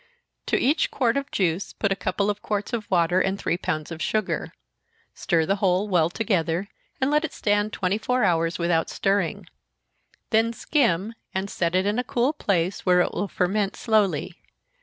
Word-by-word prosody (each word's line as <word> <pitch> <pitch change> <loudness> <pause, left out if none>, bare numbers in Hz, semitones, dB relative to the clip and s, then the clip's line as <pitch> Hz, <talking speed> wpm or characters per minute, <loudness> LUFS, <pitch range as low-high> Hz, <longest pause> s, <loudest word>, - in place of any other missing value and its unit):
To - - +2
each 290 +6 +2
quart 240 -4 +1
of 280 0 -2
juice 180 -1 -1
put 200 - -1
a - - +3
couple 200 +2 0
of 205 - -8
quarts 210 +2 -3
of 220 -3 -3
water, 180 0 +3
and 195 +1 0
three 170 - -1
pounds 155 -2 -3
of 165 0 -6
sugar 215 +1 -1 0.6
stir 165 -3 +1
the 195 +4 +1
whole 195 +1 +1
well 170 -5 +2
together, 180 -3 -1 0.3
and 265 +2 +1
let 300 +1 +3
it 320 - -4
stand 205 0 +1
twenty 195 +2 -1
four 250 +2 0
hours, 165 -3 +1
without 170 -2 +1
stirring 195 -4 0 0.9
then 225 +1 +3
skim 225 - +1 0.2
and 190 +1 -2
set 170 0 -1
it 185 +1 +2
in 210 +4 +1
a - - 0
cool 250 +4 0
place, 190 - -1
where 180 -1 +4
it - - -1
will 205 - -2
ferment 195 +2 0
slowly. 215 -4 +1
195 Hz, 180 wpm, -24 LUFS, 175-220 Hz, 0.9 s, where